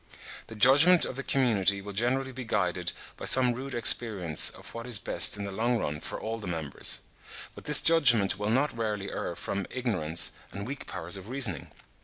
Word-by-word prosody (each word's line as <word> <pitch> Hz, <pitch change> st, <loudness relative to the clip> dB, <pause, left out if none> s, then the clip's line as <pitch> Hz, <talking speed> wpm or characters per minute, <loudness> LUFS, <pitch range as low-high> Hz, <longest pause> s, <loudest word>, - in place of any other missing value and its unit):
The 115 Hz, -, -11 dB
judgment 140 Hz, -, +5 dB
of -, -, -7 dB
the 135 Hz, -, -5 dB
community 105 Hz, -8 st, 0 dB
will 100 Hz, +1 st, -9 dB
generally 130 Hz, +5 st, -1 dB
be 130 Hz, 0 st, -8 dB
guided 90 Hz, -5 st, -1 dB, 0.3 s
by -, -, -8 dB
some 125 Hz, -2 st, +7 dB
rude 130 Hz, +2 st, -7 dB
experience 105 Hz, -8 st, +3 dB
of -, -, -12 dB
what 115 Hz, +1 st, -8 dB
is 120 Hz, -4 st, +4 dB
best 105 Hz, -, +3 dB
in 100 Hz, -, -6 dB
the 100 Hz, -, -6 dB
long 115 Hz, +5 st, -1 dB
run 75 Hz, -8 st, -4 dB
for -, -, -7 dB
all 115 Hz, +1 st, -6 dB
the 105 Hz, -, -9 dB
members; 80 Hz, -5 st, -1 dB, 0.5 s
but -, -, -14 dB
this 150 Hz, -1 st, +6 dB
judgment 120 Hz, -12 st, +3 dB
will 105 Hz, 0 st, -3 dB
not 135 Hz, +5 st, 0 dB
rarely 105 Hz, -3 st, -4 dB
err -, -, -5 dB
from 100 Hz, -2 st, -5 dB
ignorance 95 Hz, -11 st, -1 dB, 0.2 s
and 100 Hz, +1 st, -7 dB
weak 135 Hz, +4 st, -8 dB
powers 90 Hz, +1 st, -4 dB
of 95 Hz, +3 st, -11 dB
reasoning. 125 Hz, -9 st, -3 dB
110 Hz, 195 wpm, -27 LUFS, 95-130 Hz, 0.5 s, some